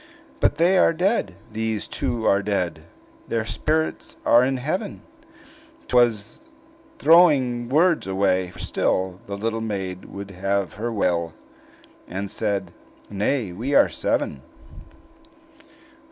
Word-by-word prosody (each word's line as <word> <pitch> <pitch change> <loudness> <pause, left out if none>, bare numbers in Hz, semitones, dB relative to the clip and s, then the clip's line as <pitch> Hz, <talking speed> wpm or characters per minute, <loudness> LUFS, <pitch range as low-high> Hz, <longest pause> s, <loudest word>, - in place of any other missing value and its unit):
"But - - +2
they 180 +3 +4
are - - +5
dead; 175 - 0 0.2
these 110 -1 -2
two 115 -2 -3
are 100 - +4
dead! 90 -6 -2 0.4
Their 115 -1 -1
spirits 155 +7 -2
are 120 +1 +6
in 130 +1 0
heaven!" 185 - -3 0.8
'T - - -3
was 115 -3 +2 0.6
throwing 135 - +4
words 165 - +3
away; 95 -1 +1
for - - -15
still 95 0 -1
The 100 0 -5
little 115 +2 -2
maid 95 -4 -4
would 100 0 -8
have 100 0 -1
her 115 +3 -4
will, 85 -6 0 0.7
And 95 +2 -5
said, 100 -3 -2 0.4
"Nay, 105 +1 -1
we 120 +11 -2
are - - +6
seven!" - - -2
110 Hz, 125 wpm, -23 LUFS, 95-130 Hz, 0.8 s, are